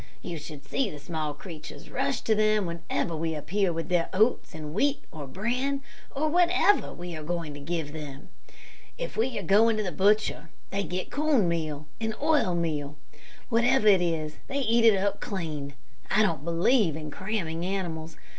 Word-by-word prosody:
You 170 -3 -4
should 150 -1 -9
see 260 - 0
the 150 - -8
small 155 -1 -3
creatures 155 0 -10
rush - - 0
to 220 - +2
them 215 -1 +3
whenever 170 0 -2
we 160 0 -1
appear 190 +5 0
with 165 0 -3
their 175 -2 +2
oats, 215 -2 +2
and 155 -1 -6
wheat, 280 - +1
or 150 -3 -7
bran, 250 - -1 0.3
or 300 +3 +1
whatever 355 +5 +4
we 175 -1 -6
are 155 - -6
going 165 -1 -3
to 145 - -8
give 160 0 -3
them. 145 -3 -8 0.7
If - - -4
they 235 +3 0
are 200 - -3
going 215 +5 +5
to 215 - 0
the 185 - -2
butcher, 205 -3 +2 0.2
they 200 - 0
get 180 +1 -4
corn 290 - +3
meal 155 -3 -2
and 220 -1 -2
oil 295 - +3
meal. 150 -4 -2 0.5
Whatever 235 -2 +4
it 190 -3 +6
is, 160 -3 -1
they 280 +1 -1
eat 230 -1 +3
it 220 -3 +7
up 200 +1 0
clean. 155 - -4 0.3
I 215 - +4
don't 165 -8 0
believe 170 - +3
in 155 -1 -6
cramming 175 -3 -2
animals. 165 -4 -3
175 Hz, 180 wpm, -28 LUFS, 160-220 Hz, 0.7 s, it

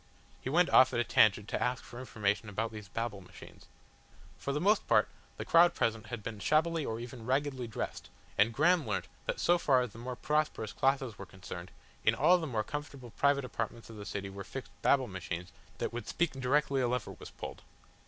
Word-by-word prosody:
He - - -4
went 175 +5 +3
off 130 - +6
at - - +2
a - - +3
tangent 105 -2 +4
to - - -2
ask 125 +1 0
for 120 - -10
information 105 -3 -1
about 110 +3 -2
these 105 -2 -8
Babble 110 0 -4
Machines. 90 - -14 0.7
For 140 - -4
the 145 - 0
most 205 +6 +3
part, - - +4 0.3
the - - -5
crowd 170 +1 +6
present 115 -1 0
had 115 -1 -6
been 110 -1 -5
shabbily 160 +6 +2
or 115 -4 -3
even 120 0 -8
raggedly 130 0 0
dressed, 110 - -5 0.3
and 105 +3 +4
Graham 160 +7 +3
learnt - - -2 0.2
that - - -1
so 175 0 +4
far 130 -6 +4
as 125 - -5
the 115 - -12
more 125 +1 -5
prosperous 150 -6 -1
classes 135 -4 0
were 100 - -7
concerned, 95 -2 -8 0.3
in - - +4
all 180 +1 +5
the 160 - -3
more 110 -5 -1
comfortable 140 -4 -7
private 140 +1 +2
apartments 115 -1 -5
of - - -10
the 105 -1 -8
city 100 -1 -4
were 100 0 -7
fixed 135 +6 -8
Babble 135 -3 +3
Machines 90 -2 -5 0.3
that - - -3
would 120 -3 -5
speak 175 -2 0
directly 135 +1 +1
a 125 - +2
lever 125 -2 -2
was - - -9
pulled. - - -8
125 Hz, 210 wpm, -32 LUFS, 110-140 Hz, 0.7 s, off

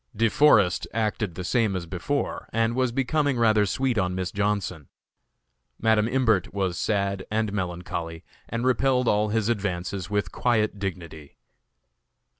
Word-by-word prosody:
De 115 +2 +2
Forest 105 - +4
acted 105 -4 -1
the 90 - -5
same 110 0 +1
as 90 -2 -3
before, 80 - -3
and 115 +1 +1
was 130 0 +1
becoming 135 +2 0
rather 110 -3 +3
sweet 125 +2 0
on 90 0 -1
Miss 95 -1 -3
Johnson. 100 -7 -2 0.9
Madam 110 -1 +3
Imbert 115 -7 +1
was 95 -3 -1
sad 100 -1 -1
and 110 -1 -1
melancholy, 85 -3 -4 0.3
and 115 +2 -2
repelled 130 0 +2
all 105 0 +2
his 110 0 0
advances 100 -3 -2
with 105 -4 -1
quiet 110 -4 0
dignity. 85 -6 -6
105 Hz, 140 wpm, -25 LUFS, 95-115 Hz, 0.9 s, Forest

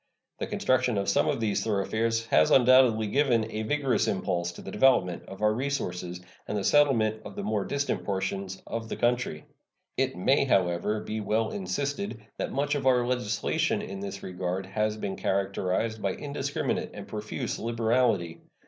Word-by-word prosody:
The - - -2
construction 125 -3 +1
of 100 -1 -1
some 100 - +3
of 145 -4 0
these 110 -3 0
thoroughfares 115 +2 0
has 80 -8 +4
undoubtedly 125 -3 +5
given 120 0 +2
a 110 - -3
vigorous 135 +2 +1
impulse 90 -2 -1
to - - -10
the 95 - -7
development 105 -10 +3
of 95 +2 -8
our 105 0 +4
resources 90 -9 -3 0.3
and 105 - -2
the 100 - -2
settlement 115 -7 +3
of 100 - -9
the - - -4
more 105 -1 -1
distant 140 0 -1
portions 95 -1 -3
of 115 -1 -5
the - - -3
country. 120 -10 0 0.5
It - - +1
may, 135 +10 +3
however, 95 -1 +1
be 110 0 -4
well 110 +2 0
insisted 145 - -3 0.2
that - - -2
much 145 +1 0
of 140 -2 -1
our 125 -2 +4
legislation 125 -4 0
in 95 0 -6
this 100 0 -6
regard 90 +1 -3
has 110 +1 -1
been 100 -2 -4
characterized 100 +3 -1
by 95 -1 0
indiscriminate 145 -1 -2
and - - -8
profuse 105 0 -4
liberality. 115 -7 +1
110 Hz, 165 wpm, -28 LUFS, 95-125 Hz, 0.5 s, undoubtedly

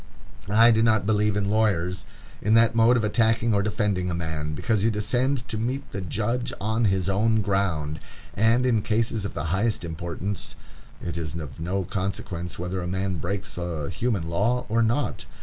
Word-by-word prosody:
I 115 +3 +7
do 110 0 +3
not 110 -3 +3
believe 105 -1 +2
in 100 -1 0
lawyers, 95 -4 +1 0.4
in 110 +2 +3
that 115 0 +5
mode 115 +2 +5
of 115 - 0
attacking 115 +1 +2
or 100 - +3
defending 100 -3 0
a 85 - -1
man, 80 -3 -3
because 105 +4 0
you 115 - +4
descend 120 +5 0
to 110 - -3
meet 130 +5 -3
the 100 - -4
judge 110 +6 -2
on 110 +3 0
his 95 -2 +1
own 110 +3 +2
ground, 90 -7 0 0.3
and, 115 +4 +3
in 115 -4 +3
cases 110 0 0
of - - -5
the - - -2
highest 105 -2 0
importance, 85 +4 -4 0.5
it 85 -1 -3
is 80 -1 -4
of 80 -2 -7
no 95 +4 -1
consequence 90 -2 -4
whether 90 +2 -3
a 90 - -4
man 95 0 -1
breaks 95 +3 -4
a 80 -5 -3
human 110 -7 -1
law 115 +9 +1
or 115 +2 +2
not. 115 +6 0
100 Hz, 185 wpm, -25 LUFS, 90-115 Hz, 0.5 s, I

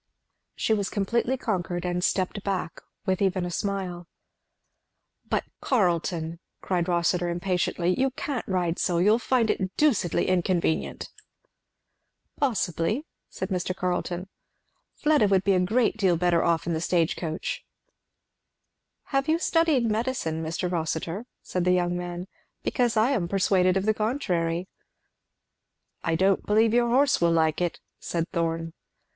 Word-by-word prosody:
She 220 - +1
was 200 -3 0
completely 235 +6 0
conquered, 180 -7 -2
and 180 0 -1
stepped 190 +2 0
back 185 -5 -3 0.2
with 190 -1 0
even 190 -2 +1
a 175 - -4
smile. 180 -2 -3 1.2
"But, - - +1 0.2
Carleton!" 170 - 0 0.2
cried 180 -2 -1
Rossitur 175 0 +1
impatiently, 180 0 0
"you 270 +1 +3
can't 265 -1 -4
ride 180 -3 0
so! 175 -2 +1
you'll 210 +6 +4
find 240 -3 +2
it 190 -1 -3
deucedly 255 - +2
inconvenient." 175 -3 0 1.3
"Possibly," 220 - 0 0.2
said - - -5
Mr. 185 -1 -1
Carleton. 180 0 -2 0.7
"Fleda 300 -7 +3
would 195 -1 +3
be 200 - +3
a 185 - +3
great 220 +5 +2
deal 185 -5 +3
better 175 0 +2
off 170 -1 +1
in 170 - -1
the 160 - -1
stage 170 -1 +1
coach." 160 -1 -4 1.5
"Have 275 +2 +1
you 320 - +4
studied 330 -7 +2
medicine, 220 -8 -1
Mr. 160 +3 -2
Rossitur?" 165 +5 -2 0.2
said 180 - -2
the 180 0 +3
young 175 -1 +1
man. 175 0 -4 0.4
"Because 240 -3 +1
I 225 +5 +4
am 205 -11 0
persuaded 185 0 +2
of 190 - -1
the 215 - +3
contrary." 185 -7 -1 1.4
"I 165 - +1
don't 190 +3 +2
believe 220 +2 +3
your 240 0 +3
horse 275 0 +3
will 170 0 +4
like 160 0 +2
it," 175 -1 -1 0.2
said 165 -1 -2
Thorn. 165 -1 -1
185 Hz, 140 wpm, -26 LUFS, 175-220 Hz, 1.5 s, you'll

